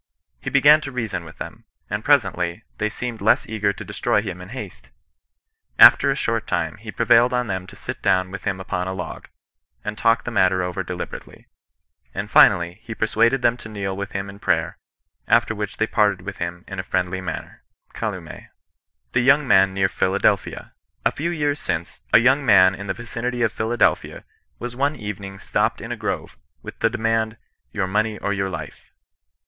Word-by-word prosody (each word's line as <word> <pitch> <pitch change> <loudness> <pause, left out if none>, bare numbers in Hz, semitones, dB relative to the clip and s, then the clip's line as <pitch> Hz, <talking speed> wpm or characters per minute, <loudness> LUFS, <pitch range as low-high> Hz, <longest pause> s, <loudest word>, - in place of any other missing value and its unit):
He - - -3
began 145 +2 +6
to 140 - -6
rea 125 -3 -2
son 95 -5 -5
with 85 - -13
them; - - -8 0.2
and, - - -3
presently, 90 +4 +1 0.2
they 105 0 0
seemed 120 0 -5
less 105 - +3
eager 105 -2 0
to - - -9
destroy 105 - 0
him 90 -4 -6
in 90 - -10
haste. 105 - -9 0.9
After - - +8
a - - +2
short - - -1
time, - - -1
he - - -8
prevailed 120 +1 +4
on 125 0 +1
them 95 -3 -4
to - - -13
sit - - -7
down 95 0 +2
with 100 - -7
him 95 -1 -1
upon 90 -1 -3
a 95 - -3
log, 90 -2 -7 0.6
and 105 - -3
talk 115 +2 +2
the 120 - -5
matter 95 -3 +2
over 90 +1 -3
deliberately; 90 -1 -7 0.7
and - - -4
finally, 85 +2 +5
he 115 -1 -7
persuaded 115 +4 +2
them 120 0 +3
to 110 - -10
kneel 100 -3 -4
with 100 0 -6
him 100 0 -3
in 100 0 -11
prayer, 85 -5 0 0.5
after 115 0 +3
which 105 -2 -5
they 110 - +2
parted 105 -4 +1
with 95 0 -6
him 85 +2 -5
in 95 -1 -6
a - - -2
friendly 95 0 -1
manner."— 90 -3 -6 0.3
CWwwi^^. - - -6 0.7
THE 125 - +3
YOUNG 135 +3 +4
HAN 95 0 +5
NEAB 95 -1 +1
PHILADELPHIA. 95 +1 0 0.2
" - - -42
A - - +4
few 165 +4 -3
years 150 -4 -1
since, 85 +1 -4
a - - +8
young 135 +5 +4
man 95 -6 +6
in 100 +1 -7
the 95 - -2
vicinity 120 +1 -3
of 110 - +1
Philadelphia, 115 +2 0 0.3
was 120 0 -6
one 140 +4 0
evening 100 -4 -7
stopped - - -1
in - - -7
a - - -2
grove, - - -4 0.3
with - - -9
the 115 - +3
demand, 115 -1 -1 0.2
* - - -50
Your 95 - -1
money, 105 +3 0
or 100 - -2
your 95 -1 -1
life.' 85 -4 -8
105 Hz, 195 wpm, -22 LUFS, 95-115 Hz, 0.9 s, After